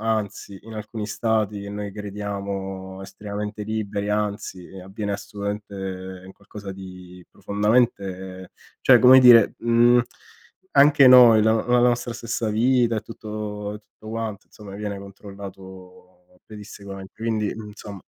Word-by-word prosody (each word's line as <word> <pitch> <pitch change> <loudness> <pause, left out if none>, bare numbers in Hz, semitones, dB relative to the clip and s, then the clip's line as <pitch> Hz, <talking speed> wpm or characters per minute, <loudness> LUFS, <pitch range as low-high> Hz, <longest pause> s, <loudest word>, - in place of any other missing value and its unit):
anzi 105 -3 -3
in 115 - -12
alcuni 105 0 -6
stati, 110 -2 -1
che 100 - -8
noi 105 -1 -5
crediamo 100 -2 -6
estremamente 105 +1 -6
liberi, 105 -2 -3
anzi, 105 -3 -3 0.2
avviene 100 +2 -5
assolutamente 95 -2 -6
qualcosa 100 0 -10
di 90 -1 -11
profondamente 100 -4 -1 0.3
cioè - - +6
come 130 +1 +8
dire, 120 -4 +7
mhmm, 120 +1 +4 0.8
anche 145 -1 +7
noi, 125 -3 +8
la 110 +1 +4
no 110 - -1
la 125 0 +4
nostra 120 0 +1
stessa 115 0 -3
vita 120 +1 +2
e - - -1
tutto 105 -1 -6
e - - -8
tutto 110 +1 -16
quanto, 110 -3 -5
insomma, 100 -2 -12
viene 100 -1 -5
controllato 95 -2 -13
pedissequamente, 100 -2 -10
quindi, 110 -2 -1
insomma. 105 -2 -10
105 Hz, 125 wpm, -23 LUFS, 95-110 Hz, 0.8 s, come